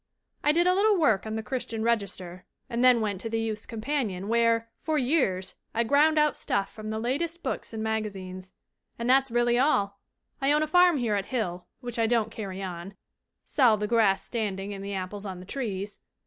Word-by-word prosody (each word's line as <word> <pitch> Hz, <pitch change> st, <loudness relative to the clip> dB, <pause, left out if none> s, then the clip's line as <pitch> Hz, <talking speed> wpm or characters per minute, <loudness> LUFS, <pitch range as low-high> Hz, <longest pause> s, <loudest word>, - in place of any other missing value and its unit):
"I 295 Hz, -, +5 dB
did 340 Hz, +3 st, +3 dB
a 365 Hz, -, +5 dB
little 410 Hz, +2 st, +4 dB
work 225 Hz, -, +2 dB
on 220 Hz, -, -3 dB
the 220 Hz, -, -3 dB
Christian 225 Hz, -2 st, -3 dB
Register 195 Hz, -6 st, -2 dB, 0.3 s
and 235 Hz, +1 st, 0 dB
then 250 Hz, -2 st, +6 dB
went 200 Hz, -3 st, -2 dB
to 225 Hz, -, -4 dB
the 225 Hz, 0 st, -1 dB
Youth's 220 Hz, -1 st, -3 dB
Companion, 220 Hz, -5 st, -2 dB
where, 230 Hz, 0 st, +2 dB
for 315 Hz, -1 st, 0 dB
years, 245 Hz, -, +1 dB, 0.2 s
I 230 Hz, -, +3 dB
ground 295 Hz, +6 st, +4 dB
out 300 Hz, 0 st, +3 dB
stuff 195 Hz, -1 st, -1 dB
from 215 Hz, -1 st, -7 dB
the 220 Hz, -, -2 dB
latest 320 Hz, +9 st, -2 dB
books 265 Hz, -, -3 dB
and 220 Hz, -1 st, -4 dB
maga 220 Hz, -1 st, -1 dB
zines. 185 Hz, -1 st, -9 dB, 0.5 s
"And 235 Hz, -, -3 dB
that's 265 Hz, +1 st, +4 dB
really 240 Hz, +1 st, +2 dB
all! 200 Hz, -8 st, +2 dB, 0.4 s
I 275 Hz, +2 st, +3 dB
own 300 Hz, +1 st, +3 dB
a -, -, -1 dB
farm 355 Hz, 0 st, +5 dB
here 235 Hz, -5 st, 0 dB
at 200 Hz, -1 st, -1 dB
Hill, 180 Hz, -8 st, -3 dB
which 240 Hz, -2 st, -5 dB
I 225 Hz, -, +3 dB
don't 225 Hz, -2 st, +1 dB
carry 195 Hz, -3 st, -6 dB
on 185 Hz, +1 st, -6 dB, 0.5 s
sell 240 Hz, -6 st, +4 dB
the 210 Hz, -, -2 dB
grass 210 Hz, -3 st, +2 dB
standing 205 Hz, -3 st, -3 dB
and 195 Hz, 0 st, -7 dB
the 200 Hz, 0 st, -4 dB
apples 190 Hz, +2 st, -5 dB
on 185 Hz, -2 st, -6 dB
the 180 Hz, -, -10 dB
trees. 205 Hz, -4 st, -4 dB
225 Hz, 205 wpm, -27 LUFS, 200-260 Hz, 0.5 s, then